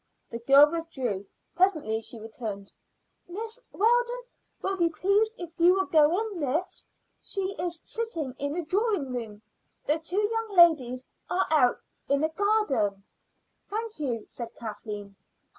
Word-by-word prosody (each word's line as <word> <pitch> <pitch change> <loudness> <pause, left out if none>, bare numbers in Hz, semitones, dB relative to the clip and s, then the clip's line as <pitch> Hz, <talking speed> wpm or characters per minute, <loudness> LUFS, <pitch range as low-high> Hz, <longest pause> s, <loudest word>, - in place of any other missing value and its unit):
The 230 - -4
girl 275 +5 +7
withdrew. 260 - -3 0.3
Presently 310 - +2
she 225 +1 -5
returned. 215 -2 -6 0.6
"Mrs. 445 +6 -4
Weldon 485 +3 +2 0.4
will 390 - -1
be 340 -3 +2
pleased 400 +6 +2
if 345 -2 -6
you 350 +2 +6
will 385 0 +1
go 305 -4 +5
in, 430 -5 -4
miss. 310 +6 -2 0.3
She 390 -1 -1
is 345 -1 -3
sitting 340 - -3
in 285 +1 -2
the 345 +1 -2
drawing 380 - 0
room. 220 -3 -6 0.4
The 305 +2 +1
two 375 +6 0
young 450 -2 -2
ladies 260 -7 +5 0.2
are 375 - +1
out 260 -6 +3 0.3
in 280 0 +2
the 315 - +2
garden." 315 - +1 0.6
"Thank 440 -2 -4
you," 240 -7 -2
said 235 -2 -7
Kathleen. 210 -2 -7
320 Hz, 140 wpm, -27 LUFS, 245-395 Hz, 0.6 s, girl